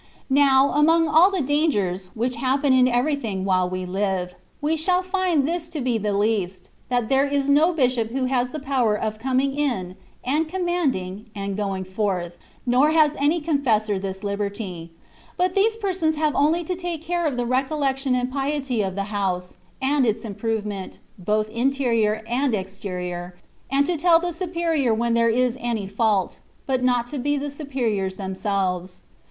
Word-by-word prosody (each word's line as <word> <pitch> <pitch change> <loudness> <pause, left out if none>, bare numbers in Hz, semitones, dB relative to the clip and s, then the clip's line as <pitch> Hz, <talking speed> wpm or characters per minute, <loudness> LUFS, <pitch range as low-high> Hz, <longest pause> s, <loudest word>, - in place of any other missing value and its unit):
Now, 275 0 +5
'among 325 +2 +4
all 320 +5 +6
the 380 -6 -1
dangers 210 - 0
(which 240 +2 -1
happen 270 +2 +2
in 255 -1 +5
everything, 245 -6 0
while 185 -2 +2
we 185 0 -4
live), 185 -1 -2 0.3
we 305 +2 0
shall 360 +3 +1
find 365 -6 +1
this 335 0 -2
to 325 -3 -5
be 245 -3 0
the 210 0 -1
least, 200 -3 -1 0.2
that 245 -3 0
there 270 +3 +3
is 280 0 0
no 310 +5 +5
bishop 250 -8 +1
who 260 +2 -1
has 250 -1 0
the 310 - -6
power 260 -6 +1
of 215 +1 -3
coining 265 +2 +1
in, 240 -11 -2 0.3
and 300 +5 0
commanding, 275 - -2
and 200 -1 -3
going 195 -2 -2
forth, 185 -3 -2 0.3
nor 255 +4 +4
has 310 -2 +4
any 300 +4 +2
confessor 235 - +1
this 190 +1 -5
liberty; 200 -4 -4 0.5
but 360 0 +1
these 430 +3 +3
persons 370 -7 0
have 305 -1 +1
only 320 +4 +2
to 360 +3 -3
take 345 -3 -5
care 345 0 0
of 270 -4 -2
the 245 - 0
recollection 270 +1 0
and 250 0 -1
piety 275 -3 -1
of 190 -2 -2
the 200 - -1
house, 185 -3 -2 0.3
and 280 +1 +2
its 220 +1 -1
improvement, 210 -2 -4 0.2
both 215 +3 0
interior 230 -4 +1
and 250 +1 +1
exterior, 180 -2 -5 0.4
and 280 +1 +3
to 355 - 0
tell 335 +1 +5
the 350 0 -3
superior 330 -8 0
when 235 +1 0
there 230 0 +3
is 250 +1 +1
any 235 -4 -2
fault, 200 -1 0 0.3
but 260 -2 0
not 245 -2 +2
to 275 +3 -5
be 290 +3 0
the 285 +1 -3
superiors 240 -10 -2
themselves. 190 -2 -2
250 Hz, 170 wpm, -23 LUFS, 205-295 Hz, 0.5 s, all